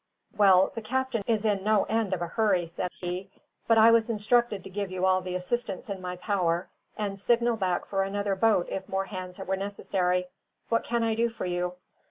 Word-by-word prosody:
"Well, 190 -2 +5
the 230 - -5
captain 260 0 -1
is 220 -2 +1
in 200 -3 +1
no 215 -1 +3
end 220 -3 -1
of 175 - -4
a - - -2
hurry," 190 -2 +1
said 170 +2 -4
he; 180 +2 -4 0.4
"but 225 - +5
I 225 +1 +8
was 230 0 +3
instructed 215 -2 +1
to - - -9
give 200 0 -3
you 185 0 -1
all 185 0 +3
the 180 0 -5
assistance 195 +2 -3
in 190 -2 -5
my 180 0 -4
power, 180 -2 -1 0.3
and 200 -2 -3
signal 235 +3 +2
back 185 -4 -1
for 195 -1 -1
another 200 +1 -1
boat 210 -3 +3
if 190 0 -5
more 195 0 -1
hands 185 -2 -7
were 190 -1 -2
necessary. 185 -2 -1 0.4
What 230 - +2
can 235 0 0
I 225 -1 +1
do 230 +1 +1
for 225 - -6
you?" 180 0 -1
195 Hz, 210 wpm, -28 LUFS, 185-220 Hz, 0.4 s, I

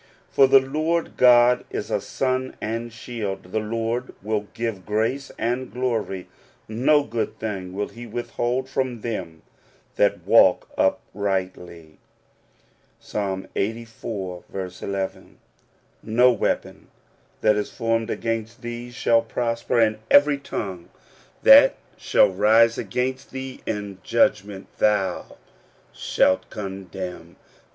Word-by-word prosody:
For 135 - +6
the 135 0 +7
Lord 155 +5 -1
God 125 0 +6
is - - -5
a - - 0
sun 130 0 -2
and 115 +2 -4
shield: 110 -5 -6
the 110 - 0
Lord 115 +3 -3
will 105 0 -2
give 115 -5 -3
grace 115 +7 -1
and 125 +2 -2
glory: 115 -7 -2 0.4
no 130 +7 +3
good 115 -3 -3
thing 95 -4 -4
will 100 +2 -3
he 120 +1 -10
withhold 120 +2 -2
from 130 -3 -2
them 90 -9 -5 0.5
that - - +2
walk - - +5
uprightly" 90 -5 -2 1.0
(Ps. - - -17
Ixxxiv. 100 -2 -4
Ii). - - -20 0.6
"No 125 +3 +4
weapon 120 - -2 0.5
that 105 - +4
is 105 0 -2
formed 115 0 -1
against 115 +2 -3
thee 120 +1 -6
shall 120 -1 +2
prosper; 115 +1 -1
and 110 -1 +2
every 145 0 +5
tongue 95 -10 -6 0.5
that - - +8 0.2
shall - - +3
rise 110 +4 +4
against 125 +5 -3
thee 130 0 -7
in 100 -3 -4
judgment 95 +1 +1
thou 100 -4 0 0.6
shalt 95 0 +1
condemn. 95 -3 -7
115 Hz, 110 wpm, -23 LUFS, 100-120 Hz, 1.0 s, that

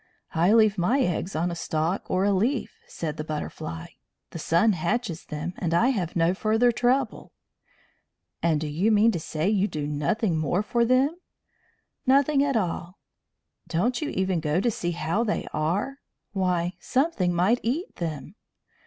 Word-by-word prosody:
"I 170 +4 +3
leave 215 -3 +4
my 230 +11 +2
eggs 180 -2 -1
on 170 +3 0
a - - -4
stalk 165 +2 -2
or 185 +1 +1
a 205 - +3
leaf," 230 +7 0
said 155 -2 -5
the 155 - -3
Butterfly. 150 - -5 0.5
"The 165 - -6
sun 170 +8 +3
hatches 175 +1 -2
them, 155 +4 -5
and 170 -2 0
I 235 +9 +4
have 185 -10 -2
no 170 +1 +3
further 220 +5 +2
trouble." 245 +3 0 1.1
"And 165 -3 +2
do 155 - -3
you 170 +9 +1
mean 215 +2 +5
to 175 - -2
say 155 +2 -2
you 205 -1 +2
do 150 -7 -4
nothing 155 +5 0
more 175 +6 0
for 235 +2 +1
them?" 265 +7 +2 0.9
"Nothing 275 +2 +4
at 275 -4 +1
all." 180 -2 -3 0.7
"Don't 220 - 0
you 300 - -2
even 190 -2 0
go 155 +2 0
to 235 +4 +1
see 175 -4 -3
how 170 +6 0
they 215 - -1
are? 195 - -1 0.3
Why, 180 -2 0
something 260 - +1
might 185 +8 +2
eat 280 +11 -3
them!" 155 -3 -5
185 Hz, 165 wpm, -26 LUFS, 165-230 Hz, 1.1 s, mean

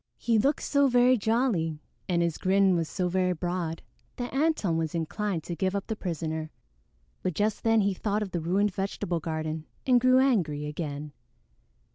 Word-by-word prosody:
He 230 -2 +2
looked 280 +7 +1
so 280 -1 +3
very 250 0 +5
jolly 220 - +1 0.3
and 170 -1 +2
his 170 -2 -1
grin 190 0 +3
was 165 -2 -1
so 180 -2 -1
very 180 0 +1
broad 175 -1 -3 0.3
that 245 0 -5
Antone 275 - +1
was 160 0 -2
inclined 170 +1 -2
to 175 - -5
give 190 +2 -1
up 200 - -2
the 220 - -3
prisoner; 160 -4 -3 0.7
but 180 - -2
just 210 +4 0
then 225 -1 +4
he 200 0 +1
thought 210 +2 -1
of 195 - -7
the 175 - -2
ruined 190 +5 +1
vegetable 185 -3 -2
garden 155 0 -4 0.2
and 250 -2 +4
grew 255 +1 +5
angry 180 - +2
again. 150 -1 -5
185 Hz, 175 wpm, -28 LUFS, 165-220 Hz, 0.7 s, very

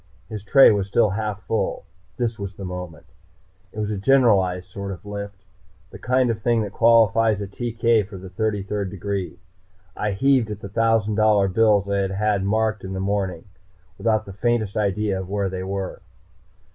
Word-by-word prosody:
His 105 -3 -6
tray 135 +6 +7
was 100 -2 0
still 105 +1 +2
half 105 -1 -3
full. - - -2 0.3
This 115 -3 -2
was 100 -2 -6
the 100 - -7
moment. 90 -3 -7 0.7
It - - -15
was 105 0 -2
a 105 - -3
generalized 100 -7 +3
sort 100 0 -6
of 95 +1 -9
lift, 100 -2 -7 0.5
the - - -11
kind 125 -1 +2
of 110 -1 -5
thing 115 -1 +2
that 100 - -5
qualifies 115 -2 +4
a 100 - -3
TK 115 0 0
for 100 -2 -9
the 95 0 -10
Thirty 105 0 -1
third 100 0 -3
degree. 100 -1 -4 0.6
I 105 -1 -2
heaved 130 +1 +2
at 105 -2 -5
the 100 - -7
thousand 110 -1 +1
dollar 105 -2 +4
bills 105 0 +3
I 100 0 0
had 95 -1 0
had 105 0 0
marked 110 +1 0
in 95 0 -5
the 95 - -4
morning, 95 -3 -2 0.6
without 110 -1 +1
the 100 - -9
faintest 110 0 -1
idea 100 -1 0
of 95 -1 -7
where 100 -1 -1
they 95 0 -5
were. 95 0 -4
105 Hz, 185 wpm, -23 LUFS, 95-110 Hz, 0.7 s, tray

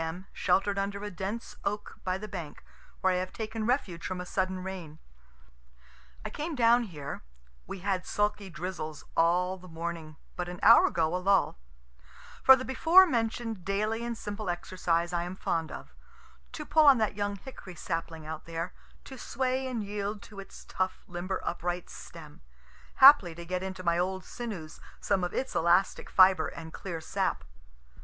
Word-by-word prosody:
M., 170 +3 -5
shelter'd 195 +2 +1
under 200 +1 -3
a 210 - -4
dense 195 +5 -5
oak 210 +1 -4
by 185 0 -1
the 215 +2 -7
bank, 175 -7 -7 0.4
where 190 0 +3
I - - +1
have 185 0 -3
taken 220 0 -4
refuge 195 -10 -1
from 185 -1 -3
a 180 - -5
sudden 185 0 -2
rain. 180 -5 -7 1.3
I - - -4
came 310 +1 -4
down 240 -1 +4
here, 145 -7 -7 0.5
(we 190 - -7
had 190 -1 -1
sulky 205 -1 -1
drizzles 170 -3 -5
all 180 +3 +2
the 185 - -13
morning, 165 -2 -6 0.2
but 175 -1 -3
an 180 - -7
hour - - +8
ago 165 0 0
a - - +2
lull,) 195 - +2 0.8
for 265 - +9
the 260 0 -5
before 330 +8 +6
mention'd 225 - -2
daily 215 +4 -1
and 235 -1 -3
simple 205 -2 -5
exercise 175 -1 -1
I 175 - +1
am 175 +2 -5
fond 165 -3 -2
of - - -9 0.6
to 300 - -6
pull 310 -1 +5
on 275 -2 +9
that 215 -2 +1
young 205 0 -1
hickory 195 -4 -10
sapling 165 -1 -4
out 155 0 -6
there 165 +2 -4 0.3
to 265 -2 -10
sway 260 +2 -1
and 240 -4 -3
yield 205 0 -4
to 205 -2 -11
its 195 - -11
tough 185 0 -2
limber 180 +2 -3
upright 175 +1 -3
stem 155 -3 -11 0.6
haply 265 - +9
to 170 0 -8
get 180 +1 -2
into 190 -1 -5
my 170 0 +2
old 190 +1 -2
sinews 200 -10 -7 0.2
some 195 -2 0
of 175 - -1
its 265 - -3
elastic 170 +3 +2
fibre 185 -3 +6
and 160 0 -9
clear 170 -4 -5
sap. - - -1
190 Hz, 175 wpm, -29 LUFS, 175-215 Hz, 1.3 s, for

